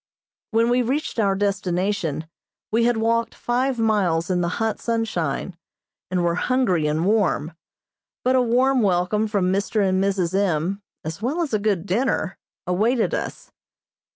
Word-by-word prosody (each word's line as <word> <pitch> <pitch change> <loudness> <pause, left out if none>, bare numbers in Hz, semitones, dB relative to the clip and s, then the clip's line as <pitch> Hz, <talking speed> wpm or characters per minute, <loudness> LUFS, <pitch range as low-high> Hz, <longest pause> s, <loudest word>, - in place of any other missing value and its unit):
When 230 +1 +2
we 250 +1 +3
reached 260 +1 -2
our 200 -3 +2
destination 190 -4 -1 0.5
we 230 +2 +3
had 240 -1 +2
walked 230 +1 0
five 250 +2 0
miles 190 -7 +1
in 180 -1 +1
the 170 - 0
hot 225 -2 -1
sunshine, 190 -8 -2 0.5
and 180 -1 0
were 170 0 +2
hungry 185 -6 +1
and 155 +3 0
warm, 190 -6 +1 0.7
but 255 +1 +3
a 255 - +4
warm 250 +2 +3
welcome 195 +2 +1
from 195 -3 +1
Mr. 200 +1 +1
and 190 0 +2
Mrs. 190 -3 0
M., 190 0 0 0.2
as 160 +5 -5
well 290 +9 0
as 295 - -5
a 215 - +2
good 200 -4 0
dinner, 205 -1 -1 0.3
awaited 220 +7 +1
us. - - -4
205 Hz, 155 wpm, -23 LUFS, 180-230 Hz, 0.7 s, a